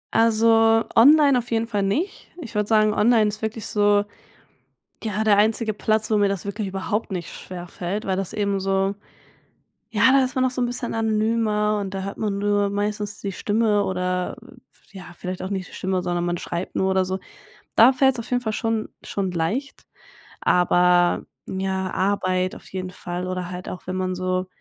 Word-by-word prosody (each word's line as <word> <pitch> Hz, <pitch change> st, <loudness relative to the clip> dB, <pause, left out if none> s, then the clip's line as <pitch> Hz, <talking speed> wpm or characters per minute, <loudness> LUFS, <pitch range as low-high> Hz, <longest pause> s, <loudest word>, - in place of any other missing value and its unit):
Also 225 Hz, 0 st, +4 dB
online 280 Hz, +1 st, +6 dB
auf 240 Hz, -, -7 dB
jeden 230 Hz, 0 st, 0 dB
Fall 210 Hz, -3 st, -2 dB
nicht. 275 Hz, -, -2 dB
Ich 230 Hz, -7 st, -8 dB
würde 210 Hz, 0 st, 0 dB
sagen, 215 Hz, -1 st, +3 dB
online 220 Hz, -1 st, +4 dB
ist 215 Hz, +1 st, -6 dB
wirklich 220 Hz, 0 st, -3 dB
so, 205 Hz, -1 st, +3 dB, 1.0 s
ja, 215 Hz, -1 st, -1 dB
der 205 Hz, -2 st, +4 dB
einzige 220 Hz, +1 st, +2 dB
Platz, 220 Hz, +1 st, 0 dB
wo 215 Hz, -, +4 dB
mir 205 Hz, -1 st, +3 dB
das 195 Hz, -2 st, -2 dB
wirklich 200 Hz, 0 st, -3 dB
überhaupt 195 Hz, +3 st, -3 dB
nicht 180 Hz, -3 st, -5 dB
schwerfällt, 180 Hz, +2 st, -6 dB
weil 190 Hz, -1 st, -1 dB
das 195 Hz, -2 st, -3 dB
eben 200 Hz, -2 st, 0 dB
so 195 Hz, +1 st, 0 dB, 1.0 s
ja, 230 Hz, +4 st, +4 dB
da 270 Hz, -1 st, +5 dB
ist 255 Hz, -, -3 dB
man 260 Hz, -, +2 dB
noch 255 Hz, -, +2 dB
so 250 Hz, -, -2 dB
'n 245 Hz, -, +1 dB
bisschen 245 Hz, 0 st, -3 dB
anonymer 215 Hz, -1 st, +1 dB
und 195 Hz, -1 st, -5 dB
da 190 Hz, -, -3 dB
hört 200 Hz, +1 st, -6 dB
man 205 Hz, -2 st, -1 dB
nur 205 Hz, 0 st, +1 dB
meistens 205 Hz, 0 st, -3 dB
die 200 Hz, -, -3 dB
Stimme 210 Hz, 0 st, +1 dB
oder 180 Hz, -1 st, -2 dB, 0.6 s
äh, -, -, -10 dB
ja, 185 Hz, -, -9 dB
vielleicht 185 Hz, 0 st, -5 dB
auch 185 Hz, -, -4 dB
nicht 190 Hz, -2 st, -3 dB
die -, -, -17 dB
Stimme, 185 Hz, -1 st, -2 dB
sondern 175 Hz, 0 st, -1 dB
man 175 Hz, 0 st, -1 dB
schreibt 175 Hz, +2 st, -5 dB
nur 190 Hz, 0 st, +1 dB
oder 190 Hz, 0 st, +2 dB
so. 190 Hz, +1 st, -3 dB, 0.6 s
Da 245 Hz, +4 st, +7 dB
fällt's 265 Hz, -2 st, +3 dB
auf 230 Hz, -, -6 dB
jeden 245 Hz, 0 st, +1 dB
Fall 220 Hz, -, -1 dB
schon 225 Hz, 0 st, -1 dB
schon 190 Hz, -2 st, -3 dB
leicht. 205 Hz, -, -3 dB, 0.6 s
Aber 180 Hz, 0 st, +3 dB, 0.2 s
ja, 190 Hz, 0 st, -2 dB
Arbeit 185 Hz, -1 st, 0 dB
auf -, -, -13 dB
jeden 185 Hz, -1 st, -4 dB
Fall 180 Hz, 0 st, -5 dB
oder 185 Hz, -1 st, -4 dB
halt 180 Hz, +1 st, -6 dB
auch, 180 Hz, -, -8 dB
wenn 185 Hz, -, -3 dB
man 185 Hz, 0 st, -1 dB
so 185 Hz, 0 st, -1 dB
205 Hz, 195 wpm, -23 LUFS, 185-225 Hz, 1.0 s, Da